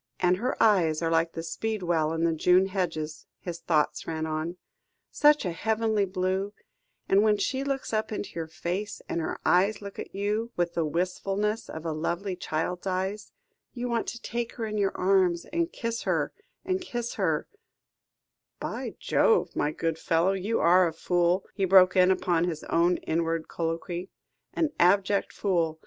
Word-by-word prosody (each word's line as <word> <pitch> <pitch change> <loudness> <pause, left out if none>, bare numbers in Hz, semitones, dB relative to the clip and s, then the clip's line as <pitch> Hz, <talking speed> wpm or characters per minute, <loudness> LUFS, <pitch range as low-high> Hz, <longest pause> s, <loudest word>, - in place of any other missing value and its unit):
"And 180 0 +3
her 250 +6 -2
eyes 170 -7 +3
are 165 - +1
like 165 0 +2
the 165 - -5
speedwell 170 -3 -1
in 165 0 -1
the 165 -1 +3
June 180 +4 +4
hedges," 165 -5 -3
his 170 -2 -6
thoughts 155 -3 0
ran 160 -1 -2
on; 160 +3 -3 0.5
"such 295 -4 +4
a 180 - 0
heavenly 220 +3 +1
blue, 190 +2 -1 0.5
and 195 +1 +5
when 210 -1 +3
she 265 +5 -1
looks 275 -4 -3
up 215 0 0
into 210 - -4
your 165 -1 -4
face, 185 +6 -4
and 170 - -2
her - - -3
eyes 195 +4 +3
look 200 -1 -9
at - - -7
you, 210 +4 -1
with 175 -1 0
the 165 - 0
wistfulness 195 +6 -1
of 160 +1 -7
a 165 - -1
lovely 175 +5 -2
child's 175 +2 -3
eyes, 190 +3 -2 0.4
you 245 0 -3
want 235 -1 -1
to 235 - -5
take 235 0 -4
her 230 - -4
in 215 -1 -3
your 195 -1 0
arms, 185 -2 +2
and 335 0 0
kiss 230 -1 -3
her - - 0 0.3
and 370 0 0
kiss 240 -9 -4
her 165 -7 0 0.6
" - - -60
"By - - -4
Jove, 450 - +2
my 150 - +1
good 165 +1 -2
fellow, 165 +4 +2
you 195 +4 -1
are 180 +1 +5
a 165 - -4
fool," 175 +2 +1
he 195 - -2
broke 185 -1 +6
in 185 0 +6
upon 175 -2 +2
his 165 -3 -3
own 170 +2 +2
inward 165 0 -1
colloquy, 170 +2 -3 0.5
"an 315 -2 +1
abject 195 +3 +3
fool. 165 -5 0
185 Hz, 175 wpm, -27 LUFS, 165-210 Hz, 0.6 s, broke